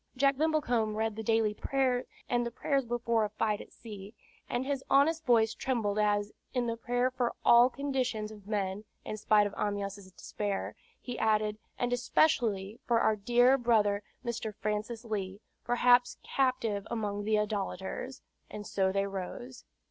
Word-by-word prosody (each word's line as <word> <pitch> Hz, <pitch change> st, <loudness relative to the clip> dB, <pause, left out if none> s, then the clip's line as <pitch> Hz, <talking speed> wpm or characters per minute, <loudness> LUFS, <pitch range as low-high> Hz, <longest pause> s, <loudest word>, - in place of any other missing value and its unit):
Jack 275 Hz, +1 st, +4 dB
Brimblecombe 260 Hz, -8 st, +1 dB
read 220 Hz, 0 st, -1 dB
the 220 Hz, -, -4 dB
daily 220 Hz, -1 st, +2 dB
prayers, 255 Hz, +1 st, 0 dB, 0.2 s
and 240 Hz, 0 st, +1 dB
the 235 Hz, -, -2 dB
prayers 270 Hz, +2 st, -1 dB
before 235 Hz, -1 st, +1 dB
a 210 Hz, -, -1 dB
fight 210 Hz, 0 st, -1 dB
at -, -, -13 dB
sea, 210 Hz, -1 st, -10 dB, 0.3 s
and 245 Hz, +2 st, -1 dB
his 275 Hz, -1 st, -2 dB
honest 315 Hz, +4 st, +4 dB
voice 225 Hz, -2 st, +4 dB
trembled 215 Hz, -5 st, -1 dB
as, 205 Hz, 0 st, +1 dB, 0.2 s
in 250 Hz, -1 st, +1 dB
the 230 Hz, -1 st, -1 dB
Prayer 245 Hz, +2 st, 0 dB
for 250 Hz, -2 st, -1 dB
all 240 Hz, +1 st, +7 dB
Conditions 255 Hz, -6 st, -2 dB
of 205 Hz, -2 st, -13 dB
Men 200 Hz, -1 st, -2 dB, 0.2 s
(in -, -, -4 dB
spite 210 Hz, 0 st, +4 dB
of 205 Hz, -, -3 dB
Amyas' 200 Hz, -1 st, -3 dB
despair), 205 Hz, -2 st, -3 dB, 0.2 s
he 245 Hz, -1 st, -6 dB
added, 215 Hz, -1 st, +1 dB, 0.2 s
"and 245 Hz, 0 st, 0 dB
especially 230 Hz, -5 st, +1 dB
for 235 Hz, -2 st, +3 dB
our 220 Hz, -, +3 dB
dear 245 Hz, +5 st, +4 dB
brother 210 Hz, -4 st, +2 dB, 0.2 s
Mr. 225 Hz, -3 st, -3 dB
Francis 215 Hz, +3 st, -3 dB
Leigh, 200 Hz, -3 st, -3 dB, 0.2 s
perhaps 245 Hz, 0 st, +4 dB
captive 230 Hz, -6 st, 0 dB
among 205 Hz, -3 st, -2 dB
the 215 Hz, +1 st, +2 dB
idolaters;" 210 Hz, +4 st, -3 dB, 0.3 s
and 210 Hz, -1 st, -7 dB
so 190 Hz, -2 st, +1 dB
they 195 Hz, +1 st, +1 dB
rose. 200 Hz, +6 st, -6 dB
225 Hz, 160 wpm, -31 LUFS, 205-245 Hz, 0.3 s, all